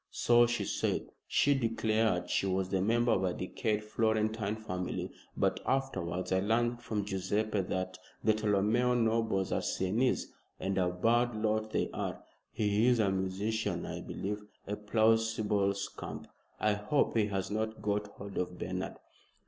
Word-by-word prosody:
"So 120 0 +4
she 120 0 -1
said. - - -1 0.2
She 145 - +4
declared 110 -6 +1
she 95 - +1
was 95 0 0
the 95 -1 +1
member 120 +4 +3
of 95 -4 +2
a 90 -2 0
decayed 105 +3 -1
Florentine 110 -1 0
family. 90 -5 -4 0.3
But - - +2
afterwards 95 -10 -1
I 95 - +3
learned 120 +4 +1
from 105 -2 -2
Guiseppe 100 +2 0
that 95 0 -3 0.2
the 110 - +5
Tolomeo 110 +4 +2
nobles 110 -4 +1
are - - +1
Sienese 110 +8 0 0.3
and 95 0 -1
a 90 -1 +2
bad 115 +6 +2
lot 110 0 0
they - - -1
are. - - -4 0.3
He 105 +2 +2
is 125 -1 +5
a 105 -4 +3
musician, 95 0 -1
I - - -5
believe 105 +2 -4 0.2
a 105 - -2
plausible 110 -1 +2
scamp. 100 0 -6 0.3
I 105 -1 +3
hope 105 +8 +1
he 110 -2 +3
has 95 -1 -2
not 110 +1 -2
got 105 0 0
hold 100 -1 -7
of 90 0 -3
Bernard." 95 0 -3
105 Hz, 155 wpm, -32 LUFS, 95-110 Hz, 0.3 s, the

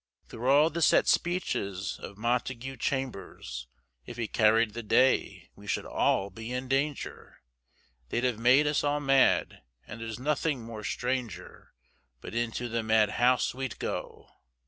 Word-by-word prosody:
Through 125 +3 -3
all 150 +4 +5
the 170 - -3
set - - +4
speeches 100 - -1
of 100 - -9
Montague 125 +3 -2
Chambers, 105 - -4 0.4
If 120 - -10
he 115 -2 -2
carried 110 0 +3
the 120 - -5
day 130 +4 +2
we - - -14
should - - -1
all 100 +1 +1
be 115 +5 -8
in 125 +1 -3
danger, 135 - -3 0.7
They'd 120 - -1
have 125 -4 0
made 130 +5 +5
us 150 0 +1
all 145 0 +1
mad, 135 -2 +3 0.2
and 115 - -9
there's 110 -1 -5
nothing 140 0 -1
more 115 -2 -8
stranger, 125 -1 -4 0.4
But - - -9
into 120 +1 -2
the 115 0 -1
madhouse 110 +3 +2
we'd 130 -2 -5
go! - - -5
120 Hz, 145 wpm, -29 LUFS, 110-135 Hz, 0.7 s, all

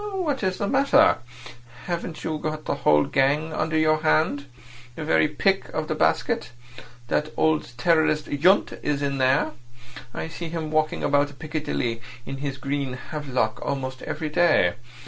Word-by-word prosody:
"What 300 -8 -1
is 185 -2 0
the 200 - -1
matter? 280 +5 +4 0.7
Haven't 170 -2 -4
you 155 -1 -2
the 155 0 -3
whole 75 - +3
gang 145 +4 +1
under 160 0 0
your 155 0 +3
hand? 155 -2 +1 0.5
The 160 - -5
very 155 - +3
pick 195 +6 0
of 155 -1 -2
the - - -1
basket? 80 +7 +1 0.6
That 150 +5 0
old 155 -6 +1
terrorist 155 0 +2
Yundt 175 +8 +2
is 145 -1 0
here. 135 -1 +2 0.6
I - - -5
see 165 +1 -6
him 160 -2 -4
walking 155 0 0
about 145 0 +1
Piccadilly 150 -7 -3 0.2
in 135 - -5
his 140 -1 -4
green 140 -1 -2
havelock 130 -4 -3
almost 130 -2 -3
every 155 0 -4
day. 150 - +3
155 Hz, 145 wpm, -24 LUFS, 140-160 Hz, 0.7 s, matter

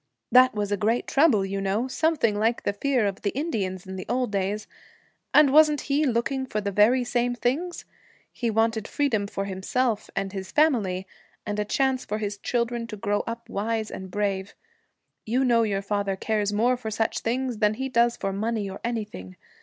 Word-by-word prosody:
That 255 0 +6
was 205 -1 -2
a 205 - +1
great 225 +5 +1
trouble, 270 -9 +3
you 195 0 -3
know; 200 +6 0
something 265 -5 +1
like 225 +3 0
the 205 - 0
fear 250 +1 +1
of 195 -1 -2
the 205 - 0
Indians 195 - -2
in 190 0 -7
the 185 - -7
old 250 -2 0
days. 200 +2 -1 0.7
And 290 -2 +6
wasn't 300 -1 +6
he 290 +1 +1
looking 260 +2 -1
for 215 - -2
the 200 -1 -2
very 225 +6 +4
same 245 0 0
things? 300 +9 -2 0.5
He 235 - -2
wanted 225 0 +1
freedom 225 -9 0
for 195 0 -4
himself 210 +4 -1
and 195 0 -2
his 190 -1 -6
family, 220 -12 +2 0.4
and 210 -1 -3
a 210 - 0
chance 265 +3 +1
for 210 - -3
his 205 -1 -4
children 235 0 -1
to 215 -2 -7
grow 205 +1 0
up 230 0 -5
wise 220 +2 -2
and 190 0 -7
brave. 200 -1 -2 0.7
You 250 +4 +1
know 235 -2 +4
your 200 -3 0
father 200 -1 -1
cares 210 +1 -1
more 240 +4 +2
for 235 -3 -5
such 220 +1 -1
things 245 0 -2
than 210 -1 +3
he 265 +3 -3
does 235 -2 +2
for 195 - -2
money 215 +1 -1
or 195 0 -8
anything. 210 - -4
220 Hz, 195 wpm, -25 LUFS, 200-250 Hz, 0.7 s, That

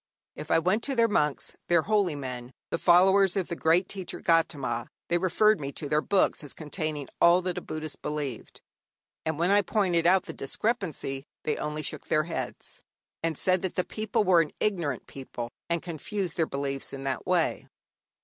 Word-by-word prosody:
If 150 +1 -8
I - - +5
went 185 +7 +2
to 275 - -1
their 230 -1 +4
monks, 150 -9 0
their 170 -2 +4
holy 200 -6 +2
men, 125 -2 -6 0.2
the - - 0
followers 190 +2 +5
of 185 - -1
the 170 - -2
great 170 +3 +3
teacher, 190 -3 -5
Gaudama, 140 -8 +1 0.2
they 175 - +2
referred 200 +4 +3
me 140 -1 -4
to 145 - -4
their 150 +1 +2
books 195 -3 +2
as 145 - -7
containing 155 -3 -4
all 175 +2 +6
that 180 -1 -2
a - - -14
Buddhist 155 -1 -5
believed; 150 -5 -5 0.7
and 160 -2 -1
when 175 +4 +2
I 205 +1 +6
pointed 180 -5 +1
out 185 +1 +5
the - - -7
discrepancies, 150 - -2 0.2
they 150 - 0
only 150 0 -3
shook 150 - -5
their 155 - +2
heads, 165 - -5 0.4
and 165 -2 -1
said 185 -1 +2
that 190 - -2
the 185 - +2
people 215 -1 -1
were 180 -3 +5
an 155 - -3
ignorant 170 - -1
people 120 -3 -7 0.2
and 170 -1 0
confused 180 +2 -4
their 160 -2 +1
beliefs 140 -1 -3
in 135 0 -6
that 135 -3 -3
way. - - +1
165 Hz, 190 wpm, -28 LUFS, 145-185 Hz, 0.7 s, all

